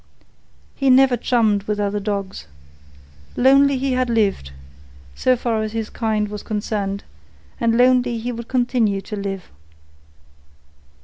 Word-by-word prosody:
He 275 -1 +1
never 260 0 +5
chummed 220 -5 +1
with 210 -1 -1
other 205 0 -1
dogs. 200 - -4 0.9
Lonely 275 +2 +5
he 265 +1 -1
had 255 -1 0
lived, 205 - 0 0.6
so 255 - +2
far 230 -2 -1
as 215 0 -4
his 225 -1 -4
kind 215 -2 -1
was 210 0 -7
concerned, 205 -2 -3 0.6
and 230 -1 +1
lonely 250 -1 +3
he 235 +2 -4
would 235 -1 -7
continue 240 -6 0
to 210 - -7
live. 195 -2 -5
225 Hz, 130 wpm, -20 LUFS, 205-250 Hz, 0.9 s, never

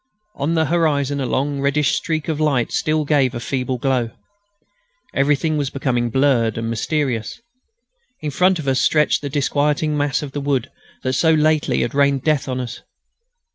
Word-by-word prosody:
On 145 +4 -1
the 160 -1 +2
horizon 145 -4 +1
a 130 - -1
long 140 +2 -1
reddish 140 0 +2
streak 160 -2 -2
of 155 -2 -2
light 140 -6 +1
still 155 0 0
gave 140 -4 +2
a - - -3
feeble 130 +1 -2
glow. 125 -2 0 1.0
Everything 150 +3 +1
was 140 -2 -1
becoming 125 -4 -1
blurred 120 -4 +2
and 115 0 -2
mysterious. 125 -2 -2 0.8
In 150 -1 -4
front 180 +5 +3
of 155 -4 -6
us 130 -2 +2
stretched 150 +4 +2
the 145 - -4
disquieting 150 +2 0
mass 145 0 0
of 145 - -6
the 145 - -4
wood 140 -3 -1 0.3
that 130 - -1
so 160 +4 +3
lately 155 0 +2
had 120 - -2
rained 140 -1 +2
death 150 -3 +1
on 130 0 -2
us. 125 -2 -6
140 Hz, 175 wpm, -20 LUFS, 130-150 Hz, 1.0 s, front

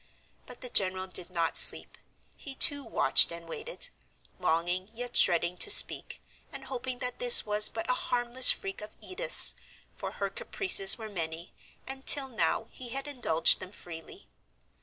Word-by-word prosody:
But 245 - -14
the 250 - -9
general 185 -3 -1
did 185 -1 -4
not 170 -2 -4
sleep; - - +2 0.4
he 275 -2 -11
too 285 0 +3
watched 225 - +3
and 170 0 -10
waited, - - -8 0.5
longing 175 +4 -3
yet 245 +1 -8
dreading 175 0 0
to - - 0
speak, - - +3 0.3
and - - -11
hoping 255 -1 -8
that 250 0 -8
this 245 -1 +5
was 210 0 +5
but 225 - -8
a 250 - -1 0.2
harmless 245 +1 +3
freak 195 +1 0
of 210 - -13
Edith's, - - +1 0.4
for - - -9
her - - -6
caprices 380 - +2
were 220 -2 -10
many, 170 -3 -8 0.3
and 265 0 -9
till 275 -2 +4
now 220 -2 -3
he 250 -2 -10
had 275 +4 -7
indulged 245 - +1
them 185 - -11
freely. 175 - -14
225 Hz, 160 wpm, -26 LUFS, 180-260 Hz, 0.5 s, this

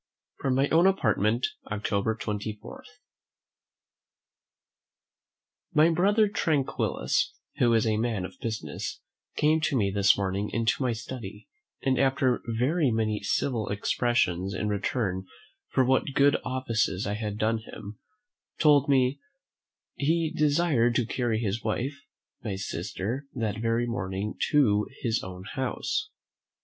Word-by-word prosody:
From 135 -2 0
my 135 +2 +3
own 170 +3 +5
Apartment, 115 - +2 0.3
October 105 +1 0
24. 105 - -5 2.9
My 155 +2 +6
brother 205 +6 +3
Tranquillus, 155 -8 0 0.2
who 120 - +3
is 115 - +3
a 110 -1 +1
man 110 -4 -1
of - - -11
business, 110 -1 -4 0.4
came 155 +1 +3
to 145 -3 +1
me 100 -4 +1
this 100 0 +4
morning 100 +1 -1
into 115 +2 0
my 125 -2 +1
study, 115 - -7 0.4
and 130 -1 +2
after 130 -2 +2
very 130 +7 +1
many 110 -2 0
civil 110 +1 -1
expressions 100 -3 0
in 105 +3 -1
return 100 -2 -1 0.4
for 130 - +2
what 130 +2 +1
good 140 +1 +5
offices 115 -6 -1
I 100 - -1
had 105 -1 -3
done 110 +1 +1
him, 105 -1 -10 0.6
told 145 -3 +4
me 130 -1 +3 0.7
"he 160 +2 0
desired 145 -6 +2
to 120 - +2
carry 120 -1 -1
his 110 0 -2
wife, 120 +5 -1 0.5
my 105 -4 -3
sister, 100 +8 -4
that 110 -3 -2
very 115 +1 +1
morning 100 -3 -3 0.2
to 105 -9 +3 0.2
his 115 -2 +1
own 90 0 -8
house." 130 - -2
115 Hz, 125 wpm, -27 LUFS, 105-135 Hz, 2.9 s, My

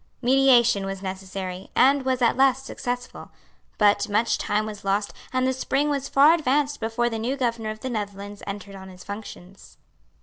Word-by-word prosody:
Mediation 240 -5 +4
was 195 0 -6
necessary, 190 -1 -6
and 275 +2 +4
was 260 -1 0
at 235 - +3
last 270 0 +3
successful. 245 -2 -5 0.5
But 205 -1 +3
much 215 +3 +1
time 210 +1 0
was 210 -1 -8
lost; 200 +1 -1 0.2
and 255 0 +1
the 260 - +1
spring 270 +3 0
was 275 -1 -2
far 290 +4 +6
advanced 290 -2 0
before 230 +2 -1
the 225 -2 -3
new 250 +5 -2
Governor 230 -4 -1
of 215 0 -7
the 260 - -4
Netherlands 205 -2 -5
entered 200 0 -6
on 190 -1 -10
his 180 -1 -13
functions. 200 -2 -10
225 Hz, 175 wpm, -24 LUFS, 200-260 Hz, 0.5 s, far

